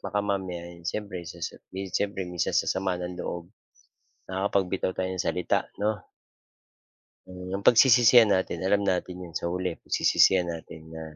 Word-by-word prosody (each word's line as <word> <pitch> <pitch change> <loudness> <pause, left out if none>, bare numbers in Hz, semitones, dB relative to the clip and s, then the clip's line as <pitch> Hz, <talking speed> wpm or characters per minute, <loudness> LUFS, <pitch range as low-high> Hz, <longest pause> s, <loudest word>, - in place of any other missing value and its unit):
Baka 105 - -1
mamaya, 95 -3 -3
'yon 85 -1 -15
siyempre, 105 -3 -4
sasa - - -6 0.2
mi 95 - -5 0.2
siyempre 100 -1 -2
minsan 90 -1 -1
sasama 95 0 0
ng 90 0 -5
loob, 85 -1 -5 0.8
nakakapagbitaw 95 -1 0
tayo 95 0 -2
ng 90 -2 -3
salita, 90 -1 +1 0.2
'no? 105 - +3 1.4
Eh, 90 0 -9
'yong 100 - -5
pagsisisihan 120 -1 +7
natin 95 -2 -2
alam 100 +1 +2
natin 90 -1 -1
'yon, 85 - -10
sa 85 - -3
huli 90 -1 -3
pagsisisihan 95 -1 +4
natin 80 -1 -9
na, 80 0 -8
95 Hz, 150 wpm, -27 LUFS, 90-100 Hz, 1.4 s, pagsisisihan